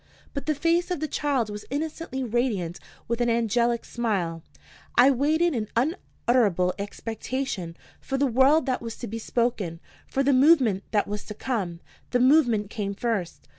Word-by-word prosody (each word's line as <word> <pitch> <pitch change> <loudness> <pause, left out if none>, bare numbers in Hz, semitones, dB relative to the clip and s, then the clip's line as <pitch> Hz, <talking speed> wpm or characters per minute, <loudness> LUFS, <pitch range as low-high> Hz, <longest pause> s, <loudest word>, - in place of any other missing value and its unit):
But 280 0 -5
the 305 - +2
face 335 +4 +1
of 360 -4 -1
the 310 - -2
child 270 -8 0
was 210 0 -6
innocently 300 -1 -3
radiant 220 -8 -1 0.3
with 235 +1 -1
an 240 - +2
angelic 235 +1 +1
smile. 190 -9 -2 0.5
I 255 +3 +7
waited 310 +6 +2
in 220 -4 -2
unutterable 235 - +1
expectation 210 -3 -4 0.2
for 270 - -3
the 280 - +2
word 270 +5 +4
that 255 -2 -1
was 230 -1 -6
to - - -7
be 225 +1 -5
spoken, 220 -8 -1 0.3
for 275 - 0
the 280 +1 +3
movement 255 - +4
that 210 -2 +1
was 210 0 -4
to 210 - -7
come. 195 -9 -3 0.3
The 245 - +1
movement 245 -6 +4
came 200 -3 -3
first. 205 -7 -3
240 Hz, 165 wpm, -26 LUFS, 210-275 Hz, 0.5 s, I